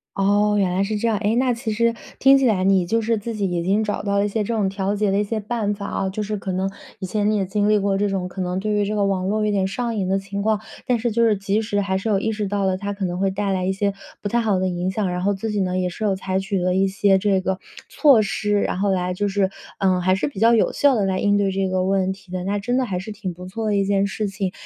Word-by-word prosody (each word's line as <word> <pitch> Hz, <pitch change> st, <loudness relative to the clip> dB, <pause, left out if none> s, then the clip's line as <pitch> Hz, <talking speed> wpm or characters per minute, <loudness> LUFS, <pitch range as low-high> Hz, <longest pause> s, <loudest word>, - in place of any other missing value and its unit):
哦， 205 Hz, +1 st, +2 dB
原 195 Hz, -2 st, +2 dB
来 190 Hz, -, +2 dB
是 210 Hz, +2 st, -1 dB
这 230 Hz, -, 0 dB
样， 220 Hz, -2 st, +1 dB
哎， 210 Hz, +3 st, +1 dB
那 250 Hz, 0 st, +2 dB
其 230 Hz, -1 st, -4 dB
实 230 Hz, +2 st, +2 dB, 0.3 s
听 275 Hz, +1 st, +7 dB
起 270 Hz, -, +2 dB
来 200 Hz, -6 st, +2 dB
你 190 Hz, -2 st, +3 dB
就 225 Hz, +6 st, +1 dB
是 225 Hz, +1 st, +1 dB
自 230 Hz, +3 st, -5 dB
己 200 Hz, -3 st, -1 dB
已 175 Hz, -1 st, -1 dB
经 200 Hz, +4 st, +2 dB
找 210 Hz, -1 st, -2 dB
到 200 Hz, -1 st, +1 dB
了 200 Hz, -, +2 dB
一 -, -, +1 dB
些 210 Hz, +1 st, -1 dB
这 230 Hz, -, -2 dB
种 210 Hz, -3 st, +1 dB
调 195 Hz, +1 st, -1 dB
节 210 Hz, 0 st, +1 dB
的 195 Hz, -, +1 dB
一 205 Hz, -, +2 dB
些 215 Hz, +2 st, -2 dB
办 215 Hz, -1 st, -2 dB
法 200 Hz, 0 st, -7 dB
啊， 195 Hz, -, -2 dB
就 195 Hz, +3 st, -4 dB
是 210 Hz, 0 st, -2 dB
可 195 Hz, -2 st, -4 dB
能 190 Hz, +1 st, -1 dB, 0.3 s
以 190 Hz, -, -4 dB
前 210 Hz, +3 st, 0 dB
你 215 Hz, -, +1 dB
也 195 Hz, -, 0 dB
经 205 Hz, +2 st, 0 dB
历 210 Hz, 0 st, +4 dB
过 200 Hz, -1 st, +1 dB
这 205 Hz, +1 st, +1 dB
种 190 Hz, -2 st, -2 dB
可 185 Hz, +1 st, -6 dB
能 180 Hz, 0 st, -2 dB
对 210 Hz, +2 st, -1 dB
于 205 Hz, 0 st, +2 dB
这 210 Hz, -, -2 dB
个 205 Hz, -1 st, +1 dB
网 190 Hz, -1 st, 0 dB
络 215 Hz, +1 st, 0 dB
有 -, -, +1 dB
点 195 Hz, -2 st, +1 dB
上 235 Hz, +2 st, -2 dB
瘾 190 Hz, -3 st, -1 dB
的 195 Hz, +1 st, +2 dB
情 200 Hz, +1 st, -5 dB
况， 215 Hz, 0 st, +1 dB, 0.3 s
但 245 Hz, -2 st, +1 dB
是 235 Hz, +1 st, -1 dB
就 235 Hz, +1 st, +3 dB
是 220 Hz, -3 st, +3 dB
及 200 Hz, +2 st, 0 dB
时 210 Hz, -2 st, -1 dB
还 195 Hz, -1 st, 0 dB
是 200 Hz, +4 st, -3 dB
有 200 Hz, -2 st, +2 dB
意 220 Hz, -, -1 dB
识 210 Hz, -1 st, -2 dB
到 200 Hz, 0 st, -1 dB
了， 190 Hz, -1 st, +1 dB
它 200 Hz, +2 st, -4 dB
可 200 Hz, -1 st, -3 dB
能 175 Hz, 0 st, -3 dB
会 195 Hz, 0 st, +1 dB
带 195 Hz, 0 st, -1 dB
来 185 Hz, -1 st, -1 dB
一 190 Hz, -, +1 dB
些 200 Hz, +1 st, 0 dB, 0.3 s
不 -, -, -3 dB
太 235 Hz, +3 st, +1 dB
好 210 Hz, -5 st, +1 dB
的 185 Hz, -, 0 dB
影 180 Hz, +1 st, -2 dB
响。 195 Hz, -1 st, -1 dB
然 180 Hz, 0 st, -2 dB
后 200 Hz, +1 st, +2 dB
自 200 Hz, +3 st, -4 dB
己 210 Hz, -1 st, 0 dB
呢 185 Hz, -1 st, -1 dB
也 180 Hz, -, 0 dB
是 180 Hz, +5 st, -6 dB
有 205 Hz, -2 st, +2 dB
采 190 Hz, 0 st, -1 dB
取 195 Hz, 0 st, -2 dB
了 180 Hz, 0 st, +1 dB
一 195 Hz, +1 st, +3 dB
些 195 Hz, 0 st, +3 dB
这 195 Hz, 0 st, +2 dB
个 190 Hz, 0 st, -1 dB, 0.3 s
措 275 Hz, -8 st, +5 dB
施， 205 Hz, 0 st, 0 dB
然 -, -, -1 dB
后 200 Hz, 0 st, +1 dB
来 180 Hz, -1 st, 0 dB
就 205 Hz, +3 st, -1 dB
是， 195 Hz, -1 st, +1 dB, 0.3 s
嗯， 185 Hz, -2 st, +2 dB
还 185 Hz, +1 st, +3 dB
是 190 Hz, -, 0 dB
比 280 Hz, -9 st, -7 dB
较 230 Hz, +1 st, +6 dB
有 225 Hz, -, +2 dB
效 285 Hz, -1 st, +4 dB
地 205 Hz, -4 st, +1 dB
来 190 Hz, -1 st, 0 dB
应 205 Hz, 0 st, +2 dB
对 200 Hz, -1 st, +1 dB
这 195 Hz, 0 st, 0 dB
个 185 Hz, 0 st, 0 dB
问 190 Hz, 0 st, +1 dB
题 190 Hz, -1 st, -11 dB
的， 180 Hz, -1 st, -3 dB
那 200 Hz, +2 st, -1 dB
真 245 Hz, +5 st, -1 dB
的 260 Hz, -, +2 dB
还 185 Hz, -6 st, -3 dB
是 210 Hz, +4 st, -7 dB
挺 200 Hz, -4 st, -5 dB
不 180 Hz, +2 st, -10 dB
错 220 Hz, +4 st, -4 dB
的 205 Hz, -1 st, +1 dB
一 195 Hz, -, +2 dB
件 200 Hz, 0 st, +2 dB
事 205 Hz, +2 st, -2 dB
情。 195 Hz, -1 st, -3 dB
200 Hz, 345 characters per minute, -22 LUFS, 190-215 Hz, 0.3 s, 听